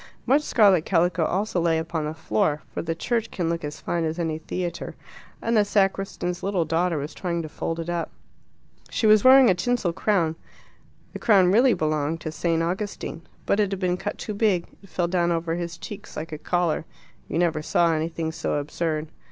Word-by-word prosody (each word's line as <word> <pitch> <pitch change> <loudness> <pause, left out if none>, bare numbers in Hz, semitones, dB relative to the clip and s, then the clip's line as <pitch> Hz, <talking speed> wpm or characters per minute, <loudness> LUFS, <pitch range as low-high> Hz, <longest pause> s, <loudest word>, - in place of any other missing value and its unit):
Much 275 +4 +4
scarlet 200 - +4
calico 175 -1 +2
also 190 0 0
lay 165 -1 +2
upon 160 -1 -2
the 155 - -3
floor 150 +1 0
for - - -2
the 165 0 -3
church 225 +5 -1
can 170 -3 -2
look 165 -1 -3
as 150 0 -5
fine 170 -1 -2
as 160 +1 -2
any 160 -2 -2
theatre 175 +2 -4 0.5
and 230 +1 +1
the 210 - +5
sacristan's 195 -3 0
little 190 -4 0
daughter 165 +1 +1
was 145 +1 -4
trying 170 -2 -2
to - - -5
fold 165 +2 -4
it 165 - -4
up. 175 -1 -2 0.8
She - - -1
was 215 -1 +6
wearing 260 0 +8
a 190 - +5
tinsel 190 -1 0
crown. 175 -4 +1 0.8
The - - -6
crown 190 -5 +5
really 240 +4 +5
belonged 155 +1 -1
to 155 - -4
St. 165 +1 0
Augustine. 180 -2 -3 0.2
But 200 - +1
it 205 -2 +2
had 195 - -3
been 180 -2 +1
cut 200 +3 -4
too 215 - -5
big: 200 -5 +1 0.2
it 195 - -17
fell 175 -1 0
down 175 -1 +1
over 165 0 -1
his 170 0 -4
cheeks 205 +5 -9
like 160 +2 -5
a 155 - -5
collar: 175 -3 0 0.4
you - - -3
never 165 -3 +1
saw 165 +2 +2
anything 160 0 -2
so 165 - -2
absurd. 155 +1 -2
170 Hz, 200 wpm, -25 LUFS, 160-195 Hz, 0.8 s, wearing